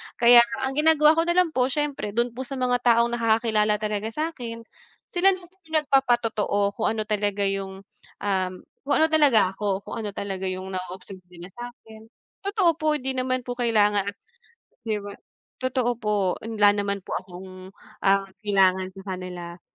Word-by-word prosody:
Kaya 240 0 +8 0.2
ang 265 - 0
ginagawa 305 -1 +5
ko 330 +1 +2
na 345 - +1
lang 360 -2 +3
po 255 -3 +1
siyempre, 275 -7 -3
do'n 240 0 +1
po 255 +2 -7
sa 275 - -5
mga 250 -1 +1
taong 235 0 +4
nakakakilala 220 -2 +2
talaga 210 0 -3
sa'kin, 245 -7 -4 0.5
sila 380 +2 +3
na 370 - -12
po 355 +2 -19
yung 320 - -5
nagpapatotoo 240 -7 +1 0.2
kung 220 - +1
ano, 215 - -1
talaga 205 -1 -1
yung, 195 0 -4 0.4
um, 190 -2 0 0.3
kung - - +2
ano 320 - +4
talaga 275 -12 +4
ako, 200 -1 -2
kung - - -7
ano 210 -2 -3
talaga 195 -1 -4
yung 185 +1 -5
na-o-observe 185 +1 -7
nila 175 +1 -10
sa'kin. 225 -2 -11 0.4
Totoo 395 -5 +3
po, 310 -1 +1
'di 265 -2 -2
naman 255 0 -1
po 245 - -6
kailangan, 210 -4 +2 0.8
'di 215 - 0
ba? 205 - -7 0.5
Totoo 255 -1 0
po 210 -2 -1 0.3
wala 210 -2 +3
naman 200 -1 -2
po - - -11
akong, 185 +1 -11 0.3
ah, 195 0 +4 0.2
kailangan 190 -2 +2
sa 195 - -9
kanila. 175 -1 -8
220 Hz, 165 wpm, -24 LUFS, 195-255 Hz, 0.8 s, Kaya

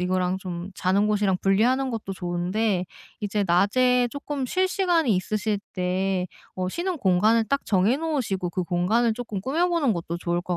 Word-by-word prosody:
이거랑 180 0 0
좀 180 -1 -6
자는 195 +3 +2
곳이랑 205 -3 +2
분리하는 250 +7 +2
것도 210 -4 -4
좋은데 180 +2 -1 0.3
이제 205 0 -1
낮에 245 +8 +3
쪼끔 285 -2 -3
쉴 370 +8 +1
시간이 350 - +2
있으실 205 +3 -1 0.2
때 185 0 0 0.3
어 185 0 -2
쉬는 360 - -2
공간을 215 - +3
딱 280 +3 0
정해 205 +6 +2
놓으시고 255 - -1
그 180 +1 -2
공간을 190 +7 +1
쪼끔 220 -4 -5
꾸며보는 325 - +1
것도 170 -2 -4
좋을 175 0 -1
것 175 0 -3
205 Hz, 340 characters per minute, -25 LUFS, 185-250 Hz, 0.3 s, 낮에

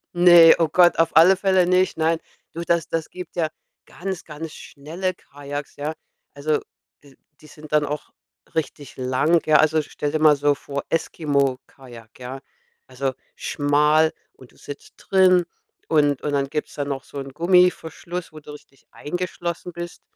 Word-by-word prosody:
Ne, 175 -2 +8
oh 165 - +2
Gott, 175 0 +5
auf 165 0 +1
alle 170 +4 +7
Fälle 190 -2 +2
nicht, 185 0 +2
nein. 165 +1 +1 0.4
Du, 170 - -5
das 170 -1 0
das 165 -1 -3
gibt 180 0 -9
ja 165 -3 0 0.4
ganz, 190 -1 -6
ganz 155 +1 -8
schnelle 165 +6 -5
Kajaks, 145 -3 -8
ja. 150 +2 -4 0.4
Also, 150 +1 -1 0.4
die 140 -2 -19 0.3
die 150 - -15
sind 150 0 -14
dann 150 -1 +3
auch 150 +1 -5 0.5
richtig 145 -2 -4
lang, 130 +6 +2
ja. 155 -1 +5
Also, 155 0 +3
stell 145 0 -4
dir 155 - 0
mal 155 -1 +6
so 145 0 +1
vor, 140 0 -6
Eskimo-Kajak, 135 -7 -3
ja. 130 +2 -7 0.5
Also 130 +1 -3 0.2
schmal 150 +2 +2 0.2
und 130 - -17
du - - -25
sitzt 145 - -11
drin 185 -2 +3 0.4
und 145 -3 +2
und 150 - -2
dann 140 -1 0
gibt's 150 +1 -4
da 145 - -3
noch 135 -2 -4
so 140 - -9
'n 135 0 -7
Gummiverschluss, 175 +2 0
wo 155 - -10
du 150 - -12
richtig 140 -2 -17
eingeschlossen 175 +1 -5
bist. 175 0 -8
155 Hz, 165 wpm, -22 LUFS, 145-170 Hz, 0.5 s, Ne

